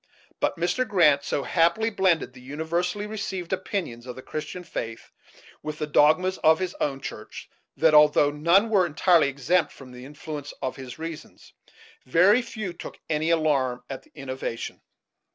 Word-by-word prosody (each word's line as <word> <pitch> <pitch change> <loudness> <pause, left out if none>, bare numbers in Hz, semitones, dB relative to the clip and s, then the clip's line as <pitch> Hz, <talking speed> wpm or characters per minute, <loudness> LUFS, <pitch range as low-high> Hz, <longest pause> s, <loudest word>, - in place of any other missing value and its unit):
But - - 0
Mr. 180 +9 0
Grant 155 -9 +4
so 140 - -2
happily 175 +7 +2
blended 185 - +1
the 125 - -14
universally 170 +8 -2
received 195 -4 -4
opinions 180 - -4
of 125 - -6
the 130 - -10
Christian 165 +4 -6
faith 115 -8 -6 0.5
with 155 0 -5
the 150 - -2
dogmas 155 +5 +3
of 160 0 +5
his 185 0 -3
own 135 -2 -1
church - - -8 0.3
that, 160 - +4
although 150 -1 +6
none 170 +9 +3
were 190 -4 +4
entirely 165 -1 +3
exempt 155 +6 +1
from 130 -2 -13
the 125 0 -11
influence 145 +1 -8
of 130 - -3
his 130 -2 -9
reasons, 160 0 -9 0.5
very 185 - +5
few 220 -6 -6
took - - -9
any 155 +1 0
alarm 140 -7 +1
at 135 - -6
the - - -26
innovation. 130 -4 -5
160 Hz, 160 wpm, -25 LUFS, 140-180 Hz, 0.5 s, although